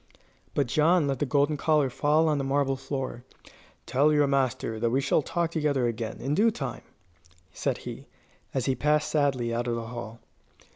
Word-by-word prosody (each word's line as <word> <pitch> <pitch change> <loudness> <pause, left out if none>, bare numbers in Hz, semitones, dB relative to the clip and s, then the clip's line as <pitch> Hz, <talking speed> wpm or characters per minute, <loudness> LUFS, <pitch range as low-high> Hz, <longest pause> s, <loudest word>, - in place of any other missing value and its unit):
But 145 - +2
John 155 +6 +3
let 135 -2 -1
the 145 - 0
golden 145 +3 +2
collar 150 -3 +2
fall 155 +5 +2
on 150 -2 +1
the - - -1
marble 135 0 +1
floor. 135 -2 -5 0.6
"Tell 145 +4 +3
your 150 -1 +4
master 130 -5 0
that 115 +1 +1
we 130 +3 +1
shall 140 +3 +2
talk 170 +3 -2
together 150 -6 +1
again, 115 -1 -3
in 135 +3 -2
due 215 +8 +4
time," 135 - -5 0.7
said - - -1
he, - - -8 0.4
as 130 -2 -1
he 135 - +2
passed 150 +2 +1
sadly 135 -6 +1
out 120 +1 -1
of 120 - 0
the 115 -1 -4
hall. 115 -1 -7
135 Hz, 185 wpm, -27 LUFS, 120-150 Hz, 0.7 s, your